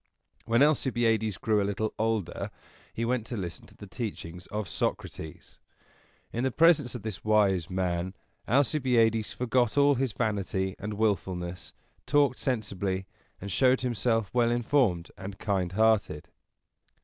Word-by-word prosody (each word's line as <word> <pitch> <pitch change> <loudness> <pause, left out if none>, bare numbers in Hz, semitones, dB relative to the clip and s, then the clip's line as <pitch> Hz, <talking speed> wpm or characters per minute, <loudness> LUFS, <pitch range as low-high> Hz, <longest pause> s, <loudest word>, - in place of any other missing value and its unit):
When 115 +4 +4
Alcibiades 115 -8 +2
grew 110 -2 +1
a - - +1
little 100 +2 -2
older, 110 -5 -1 0.4
he 115 - -3
went 120 -1 0
to 120 - -4
listen 85 -4 -6
to - - -17
the - - -9
teachings 95 -5 -6
of 105 -2 -4
Socrates. 80 -1 -4 0.7
In 120 - -1
the 130 - +2
presence 150 -3 +4
of 120 - -6
this 110 -3 -5
wise 100 -6 +2
man, 90 0 -2 0.3
Alcibiades 120 -5 +2
forgot 125 0 +1
all 145 0 +6
his 130 -2 0
vanity 95 -3 -1
and 105 +1 -4
willfulness, 95 -4 -2 0.3
talked 145 -3 +3
sensibly, 100 -6 -2 0.3
and 100 +1 -6
showed 130 +7 +3
himself 115 -3 0
well 120 -1 +3
informed 120 -7 +1
and 95 +1 -7
kind 95 -4 -1
hearted. 110 -8 +2
110 Hz, 135 wpm, -28 LUFS, 95-120 Hz, 0.7 s, all